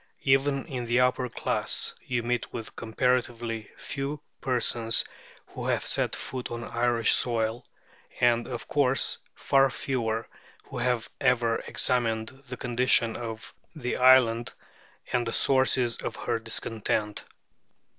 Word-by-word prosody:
Even 135 0 +2
in 130 -6 -4
the 120 +2 +3
upper 125 0 +2
class, - - -1
you 120 -2 -2
meet 120 +1 -1
with 115 -2 -7
comparatively 120 -1 -1
few 140 +1 -4 0.2
persons 120 -3 +2 0.4
who - - -6
have - - 0
set - - 0
foot 130 -2 -6
on 120 0 -5
Irish 120 -1 +2
soil, 115 -1 0 0.5
and, 120 -1 +3
of 120 -2 -6
course, 135 -2 +2 0.2
far 135 0 +3
fewer 115 -4 -2 0.4
who - - -7
have 120 -1 0
ever 120 -3 +2
examined 115 -3 0 0.2
the 125 - -5
condition 120 -1 +2
of 115 -2 -6 0.2
the 125 -5 -2
island 125 -2 +5 0.6
and 120 -1 +1
the 115 - -2
sources 130 -3 +2
of - - -4
her 115 - -2
discontent. 110 -2 -2
120 Hz, 125 wpm, -27 LUFS, 115-130 Hz, 0.6 s, island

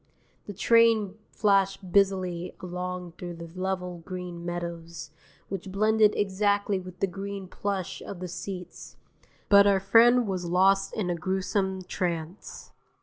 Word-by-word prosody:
The 205 - -5
train 225 -1 +4 0.2
flashed 195 -2 +1
busily 185 -3 +1
along 180 -1 -5
through 175 -1 -6
the 170 0 -8
level 185 -1 -3
green 180 0 -7
meadows, 170 -2 -6 0.4
which 195 0 -6
blended 215 +1 +3
exactly 205 0 +1
with 185 -1 -11
the - - +4
green 195 0 -6
plush 195 -1 -4
of 190 - -8
the 180 - -5
seats, 180 +1 -8 0.5
but 200 0 +7
our 195 -1 +4
friend 235 +5 +5
was 185 -3 -3
lost 195 +2 +3
in 185 -5 -1
a - - -1
gruesome 190 +2 -1
trance. 175 0 -5
190 Hz, 135 wpm, -27 LUFS, 180-200 Hz, 0.5 s, but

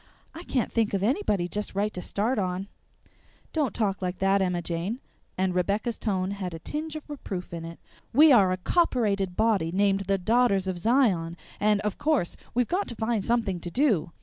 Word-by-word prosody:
I 325 - -8
can't 265 -8 -1
think 225 -3 +1
of 195 - -1
anybody 210 - +1
just 205 +1 -4
right 210 +2 0
to 180 - -4
start 215 +6 -1
on!" 185 0 -2 0.9
"Don't 295 -7 +1
talk 200 -2 -1
like 180 0 -2
that, 195 +1 +2
Emma 180 -2 0
Jane," 175 +8 -3 0.4
and 185 0 +1
Rebecca's 200 +6 -1
tone 190 -3 -1
had 185 -4 -4
a - - -5
tinge 305 - -5
of 310 - -7
reproof 195 - -6
in 165 -1 -5
it. 165 0 -8 0.3
"We 300 +5 +7
are 200 -7 +6
a 185 - 0
copperated 200 - +1
body 205 -7 +2
named 195 +1 +1
the 195 0 +2
Daughters 200 -1 +2
of 185 -2 -2
Zion, 185 -7 +2 0.2
and, 210 0 +2
of 210 -1 -3
course, 290 - +1 0.2
we've 245 -1 +2
got 385 +3 -1
to 235 - -6
find 220 -2 -1
something 220 -6 0
to 175 - -6
do. 205 - +1
200 Hz, 195 wpm, -27 LUFS, 185-235 Hz, 0.9 s, We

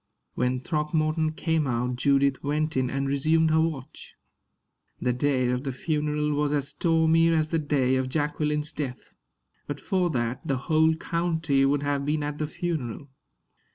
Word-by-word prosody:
When 125 0 0
Throckmorton 155 +1 0
came 160 -2 0
out, 125 0 -1
Judith 140 +1 +2
went 155 +2 -1
in 130 -1 +1
and 135 +1 -1
resumed 155 +4 +2
her 160 0 +4
watch. 150 -4 -5 0.8
The 125 - 0
day 130 -1 +1
of 125 +1 -1
the 135 - -2
funeral 150 +2 -1
was 145 0 0
as 140 -1 -1
stormy 165 0 +3
as 155 -2 +1
the 165 - +1
day 135 -4 +1
of 130 0 -1
Jacqueline's 150 +1 -1
death. 130 -4 -6 0.5
But 145 0 -4
for 185 +2 0
that, 120 -4 -2
the 135 - -1
whole 160 +3 +2
county 160 -4 0
would 140 +1 +1
have 145 -1 0
been 150 +1 0
at 145 0 -4
the 155 - -1
funeral. 145 -5 -4
150 Hz, 160 wpm, -26 LUFS, 135-160 Hz, 0.8 s, her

